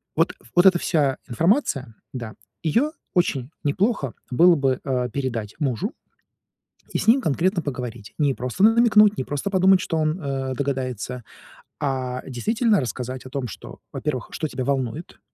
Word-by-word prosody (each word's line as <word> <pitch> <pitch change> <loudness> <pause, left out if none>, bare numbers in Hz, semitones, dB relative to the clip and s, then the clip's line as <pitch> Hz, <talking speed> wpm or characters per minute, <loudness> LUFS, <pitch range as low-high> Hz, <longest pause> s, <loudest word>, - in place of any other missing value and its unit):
вот - - +2 0.2
вот 175 - +5
эта 185 - +6
вся 145 -5 +1
информация, 140 - +1 0.2
да, 120 -4 -6 0.3
её 235 - +2 0.2
очень 140 -7 +1
неплохо 150 - 0 0.2
было 170 +6 +6
бы, 135 -3 +1
э, 125 -2 -1
передать 115 -6 -3
мужу 155 - -1 1.0
и - - 0
с - - -3
ним 240 +5 +6
конкретно 175 +4 +1
поговорить. 120 -6 -6
Не 145 -3 +2
просто 125 +11 -1
намекнуть, 215 -2 +6
не - - -1
просто 145 +7 -3
подумать, 190 -1 +5
что 165 - -2
он, 155 +3 0
э, 135 -3 -2
догадается, 130 -3 -3 0.6
а 130 -3 -2
действительно 215 - +1
рассказать 125 +1 -4
о 130 - -8
том, 130 -2 -3
что, - - -10
во-первых, 140 -5 -3
что 155 - -2
тебя 130 -3 -4
волнует, 140 +4 -2
140 Hz, 155 wpm, -23 LUFS, 125-180 Hz, 1.0 s, эта